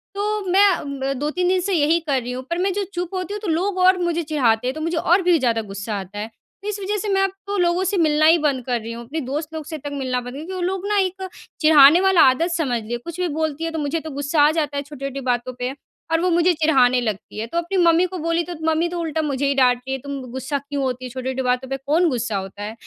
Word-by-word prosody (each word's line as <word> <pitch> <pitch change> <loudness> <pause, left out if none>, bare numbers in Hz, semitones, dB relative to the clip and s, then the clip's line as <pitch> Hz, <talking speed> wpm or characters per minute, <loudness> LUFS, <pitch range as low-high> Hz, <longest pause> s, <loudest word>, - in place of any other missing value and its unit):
तो 420 +1 -1
मैं 400 +2 +6
अ, 360 - -1
ब 275 -1 -3
2,3 305 +5 -1
दिन 370 +1 +2
से 390 +1 -1
यही 325 +1 +3
कर 285 -5 -1
रही 245 +1 -5
हूँ 255 +1 -5
पर 340 - -1
मैं 380 +2 +1
जो 405 - -1
चुप 350 +1 -4
होती 370 +1 -3
हूँ 415 - -4
तो 425 - -5
लोग 365 +4 0
और 370 0 +5
मुझे 345 -1 -1
चिढ़ाते 250 -6 +1
हैं, 260 - -1
तो 310 - -6
मुझे 330 +1 -1
और 350 +4 +3
भी 350 -2 +4
ज़्यादा 230 -4 +1
गुस्सा 200 0 -5
आता 195 +2 -8
है। 215 +2 -4 0.4
इस 415 -1 -4
वजह 405 +2 -2
से 420 +1 -3
मैं 390 -1 +2
अब 390 - +1 0.2
तो 405 0 -2
लोगों 350 0 +2
से 380 +1 0
मिलना 310 -2 +3
ही 330 +2 +7
बंद 280 -5 0
कर 245 -2 0
रही 230 - -6
हूँ। 235 +1 -7
अपने 310 +7 -4
दोस्त 300 +4 -4
लोग 315 -1 -5
से 315 +1 -6
तक 290 0 -7
मिलना 260 -3 -2
बंद 245 0 -8 0.2
कर - - -4
वो 370 - -4
लोग 380 +2 -2
ना 420 - +1
एक 380 0 -1 0.4
चिढ़ाने 310 +2 +7
वाला 380 -3 +5
आदत 330 +7 0
समझ 275 -9 -1
लिए, 235 +3 -3
कुछ 335 +8 -9
भी 360 - +1
बोलती 315 -1 -2
है 330 - -2
तो 320 - -3
मुझे 295 +3 -1
तो 315 - -8
गुस्सा 285 +2 0
आ 295 +1 +6
जाता 300 -3 -1
है 280 - -2
छोटी-छोटी 275 -1 -6
बातों 250 0 -1
पे। 250 +1 -2 0.4
और 325 - +3
वो 365 - +2
मुझे 345 +1 +3
चिढ़ाने 270 -6 +3
लगती 215 -2 -4
है। 220 - -2
तो 335 - -4
अपनी 345 +3 -1
मम्मी 340 0 +4
को 370 - -3
बोली 335 +1 0
तो 350 - -7 0.2
मम्मी 325 +2 +1
तो 345 0 -4
उल्टा 320 -1 -1
मुझे 285 -2 -1
ही 280 - +1
डाँटती 250 0 +2
है, 270 - -1
"तुम 280 +1 -6
गुस्सा 265 +2 -3
क्यों 280 0 -4
होती 255 -1 -3
है - - -6
छोटी-छोटी 260 +1 -3
बातों 250 0 0
पे 270 - -2
कौन 305 +6 +2
गुस्सा 235 -6 -2
होता 195 +1 -7
है?" 215 +2 -5
305 Hz, 280 wpm, -21 LUFS, 260-345 Hz, 0.4 s, ही